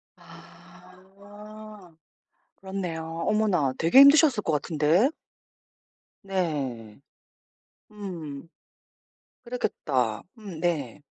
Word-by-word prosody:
아. 185 +4 -15 0.6
그렇네요. 185 -4 -5 0.2
어머나 195 -11 +1
되게 170 +11 +5
힘드셨을 280 -4 +7
것 160 - -1
같은데. 155 - +2 1.1
네. 140 - -3 0.9
음. 165 -8 -8 1.0
그랬겠다. 130 - -2
음 195 -7 -9
네. 150 -7 -2
180 Hz, 140 characters per minute, -26 LUFS, 155-205 Hz, 1.1 s, 힘드셨을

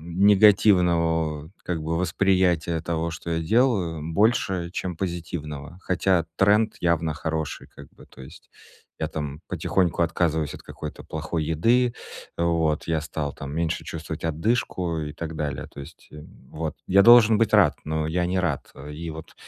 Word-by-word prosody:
негативного 85 -4 +3
как 80 -3 -3
бы 80 +1 -2
восприятия 90 -3 +1
того, 85 0 -2
что 85 +1 -7
я 80 - 0
делаю, 100 -8 +2
больше, 95 -5 +1
чем 90 -2 -4
позитивного. 85 -3 -5
Хотя 90 -2 +1
тренд 105 +2 +3
явно 85 -2 +1
хороший, 80 0 -4
как 70 -1 -14
бы. - - -17
То 65 - -14
есть 65 - -14 0.5
я - - -1
там 75 -1 -5
потихоньку 85 -2 0
отказываюсь 80 -3 0
от - - -10
какой-то - - -8
плохой 80 0 -3
еды, 115 +10 +2 0.4
вот, 80 -2 +1
я 80 -1 0
стал 75 -2 -4
там 70 +2 -8
меньше 80 0 -2
чувствовать 80 -1 -6
одышку 85 0 -1
и 75 -1 -5
так 80 0 -6
далее, 75 -2 -3
то 70 - -11
есть, 75 +4 -13
э, 75 0 -10 0.3
вот. 80 0 -4
Я 100 +1 +5
должен 115 -2 +7
быть 110 -2 +1
рад, 85 -10 +5
но 80 0 -2
я 90 +2 0
не 95 +1 -1
рад. 80 -6 -2
Э, 75 +2 -9
и 80 +2 -6
вот 80 0 -10
85 Hz, 160 wpm, -24 LUFS, 80-95 Hz, 0.5 s, должен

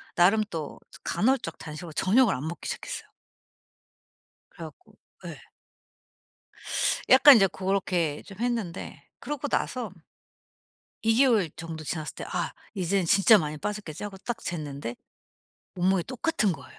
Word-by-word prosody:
나름 200 +5 +5
또 160 -3 -5 0.2
간헐적 230 -8 0
단식으로 155 +1 -8
저녁을 230 - +3
안 145 +5 -5
먹기 170 - -6
시작했어요. - - -5 1.4
그래 - - -10
갖고 - - -17 0.3
예. - - -8 1.7
약간 270 0 +9
이제 195 -3 +5
고렇게 185 -5 -1
좀 195 -1 -12
했는데 230 -7 -3 0.2
그러고 290 -1 -4
나서 240 -8 -2 1.1
2 225 0 +3
개월 230 - +4
정도 160 -1 -7
지났을 155 0 -4
때 - - -7
'아 - - -3 0.2
이젠 190 0 0
진짜 195 +5 +6
많이 155 -4 -2
빠졌겠지.' 205 -2 -5
하고 200 -2 -6
딱 240 +4 -4
쟀는데 145 - -5 0.8
몸무게 185 0 +2
똑같은 245 - 0
거예요. - - -12
190 Hz, 270 characters per minute, -27 LUFS, 165-225 Hz, 1.7 s, 약간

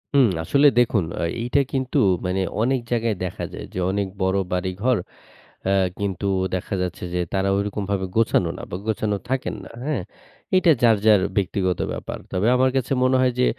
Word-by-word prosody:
হুম, 135 -3 +6 0.2
আসলে 140 - +4
দেখুন 115 -6 +2 0.2
আ - - 0 0.2
এইটা 125 +4 +1
কিন্তু 130 -1 -1 0.3
মানে 90 +1 0 0.2
অনেক 130 +3 +2
জায়গায় 115 -2 +1
দেখা 90 - -4
যায় - - -6
যে, - - -6
অনেক 100 0 -1
বড় 95 +1 +2
বাড়িঘর 95 +7 0 0.7
আ - - +3 0.3
কিন্তু 100 -1 -2 0.3
দেখা 95 +2 -3
যাচ্ছে 90 -1 -4
যে, - - 0
তারা 95 0 +1
ঐরকমভাবে 100 -1 -2
গোছানো 110 -6 +3
না - - -8
বা - - -3
গোছানো 110 -1 0
থাকেন 130 0 -1
না। - - -10 0.2
হ্যাঁ? 145 -9 -1 0.5
এইটা 185 -2 +5
যার, 115 -2 +6
যার 105 -3 +7 0.2
ব্যক্তিগত 95 -2 0
ব্যাপার। - - -6
তবে 95 +3 +1
আমার 130 +1 +3
কাছে 130 0 0
মনে 130 +1 +4
হয় 130 -1 +3
যে, 125 - +5
105 Hz, 175 wpm, -23 LUFS, 95-125 Hz, 0.7 s, যার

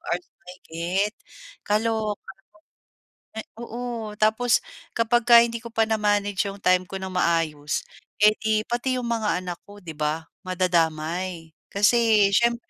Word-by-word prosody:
hours - - -3 0.2
mahigit, 180 +2 -3 0.6
kaloka, 215 -2 -1 1.3
oo. 235 -2 -5
Tapos 220 +3 +3 0.3
kapagka 235 0 +5
hindi 235 0 0
ko 235 -1 -10
pa 225 -1 +3
na-manage 205 -2 +1
'yong 200 0 -6
time 185 -1 +3
ko 195 - -6
ng 190 - -5
maayos 165 -4 0 0.4
eh, 210 0 +7
'di 220 -1 +1
pati 250 +2 -1
'yong 235 - -4
mga 220 -5 0
anak 175 -1 -5
ko 205 0 -14
'di 165 -3 -8
ba 155 +2 -1 0.2
madadamay. 170 -1 -1 0.2
Kasi, 210 0 +4
siyempre 235 +3 +1
205 Hz, 130 wpm, -24 LUFS, 180-230 Hz, 1.3 s, eh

